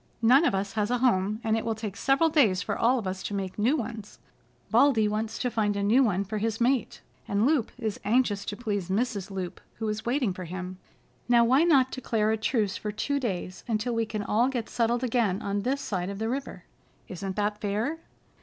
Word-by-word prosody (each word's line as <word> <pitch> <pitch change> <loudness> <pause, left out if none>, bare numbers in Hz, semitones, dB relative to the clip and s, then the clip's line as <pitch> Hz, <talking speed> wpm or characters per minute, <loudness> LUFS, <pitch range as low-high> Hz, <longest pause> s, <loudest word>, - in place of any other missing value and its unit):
"None 260 +8 +6
of 195 - +2
us 195 +1 -2
has 210 -1 0
a 245 - +1
home, 215 -4 +1
and 220 -1 +1
it 225 - -1
will 225 -1 -1
take 215 -3 -5
several 275 +8 +3
days 210 - +3
for - - -2
all 245 +3 +3
of 225 - -4
us 190 0 -3
to 205 - -4
make 190 0 -4
new 250 +9 +3
ones. 220 -4 -6 0.5
Baldy 235 -7 +4
wants 215 +1 -2
to 250 - -1
find 210 -3 0
a 200 - -1
new 225 +6 +4
one 200 -5 +1
for 210 +2 -4
his 225 0 -1
mate, 245 -1 0 0.3
and 200 +2 +1
Loup 275 -5 +2
is 220 -4 -3
anxious 210 -2 +1
to 205 - -4
please 205 -6 -3
Mrs. 205 -1 -1
Loup, 190 -2 -5
who 220 - -4
is 215 0 -3
waiting 240 -4 0
for 185 0 -7
him. 185 +1 -6 0.5
Now 235 -1 +6
why 260 +6 +4
not 270 -6 +4
declare 220 -4 0
a 220 - +1
truce 215 -3 0
for 210 - -4
two 280 +7 -1
days 185 -7 -4
until 230 +1 -1
we 230 -1 0
can 215 -1 -3
all 225 +4 +2
get 245 -4 -3
settled 235 +1 0
again 225 -6 +1
on 200 0 -1
this 270 +6 -1
side 185 -2 -3
of 200 - -5
the 220 +2 -2
river? 270 +3 -4 0.4
Isn't 190 +1 -5
that 210 0 -1
fair?" 215 +10 -1
220 Hz, 220 wpm, -27 LUFS, 200-245 Hz, 0.5 s, None